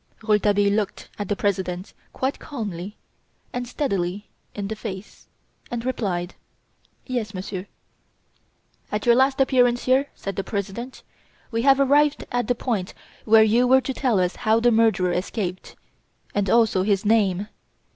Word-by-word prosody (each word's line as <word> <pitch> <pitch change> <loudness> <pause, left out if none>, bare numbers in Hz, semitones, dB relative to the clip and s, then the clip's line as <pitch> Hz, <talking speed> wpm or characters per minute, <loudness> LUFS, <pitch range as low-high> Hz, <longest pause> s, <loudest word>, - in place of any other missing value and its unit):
Rouletabille 205 -2 +3
looked 205 -2 -2
the 205 +1 -2
President 190 -2 -2 0.2
quite 265 +2 -2
calmly 205 - -6 0.6
and 245 0 -3
steadily 200 -7 -2 0.3
in 200 -1 -3
the 220 - -4
face, 205 -2 -8 0.4
and 240 0 -4
replied: 190 -8 -2 0.7
"Yes, 230 -6 -3
Monsieur." 185 +1 -5 1.2
"At 210 0 -2
your 240 - +6
last 265 +2 +3
appearance 245 -2 +3
here," 265 +2 +2
said 195 -1 -6
the 195 - -1
President, 205 +6 -5 0.5
"we 230 0 0
had 270 +2 +5
arrived 285 +2 +3
at 245 -2 0
the 245 - +1
point 215 -7 -3 0.3
where 220 0 +7
you 235 +3 +3
were 260 +1 +5
to 265 - -3
tell 250 -7 +1
us 180 0 0
how 220 +1 +2
the 240 +1 +3
murderer 220 -5 +3
escaped, 180 0 -3 0.6
and 200 -2 0
also 225 -4 +3
his 200 +1 +1
name. 205 -3 +2
215 Hz, 145 wpm, -23 LUFS, 195-245 Hz, 1.2 s, where